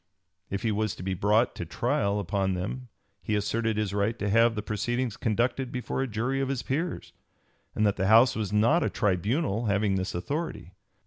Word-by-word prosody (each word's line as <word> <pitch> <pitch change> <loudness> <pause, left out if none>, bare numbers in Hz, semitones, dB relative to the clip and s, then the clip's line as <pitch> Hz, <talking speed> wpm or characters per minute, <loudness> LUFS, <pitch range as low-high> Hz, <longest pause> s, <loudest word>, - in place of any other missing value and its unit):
If 100 - -3
he 115 - +1
was 105 -1 -1
to - - -9
be 95 0 -1
brought 105 +6 +2
to - - -5
trial 100 +4 0
upon 95 -1 -1
them 115 +8 -4 0.3
he 105 +5 -1
asserted 110 +2 0
his 105 -2 -1
right 105 +3 0
to 105 -2 -2
have 115 +1 +4
the 105 - -3
proceedings 120 +2 -2
conducted 120 +4 0
before 125 +1 -3
a 135 - 0
jury 120 +5 -1
of 135 - -1
his 135 -3 -2
peers, 160 +6 -3 0.6
and 110 - +2
that 100 - +1
the 95 0 0
House 115 +4 +6
was 105 -3 -2
not 115 +11 +3
a - - +1
tribunal 110 - 0
having 100 -1 +1
this 95 -1 -3
authority. 140 - -4
110 Hz, 195 wpm, -27 LUFS, 100-120 Hz, 0.6 s, House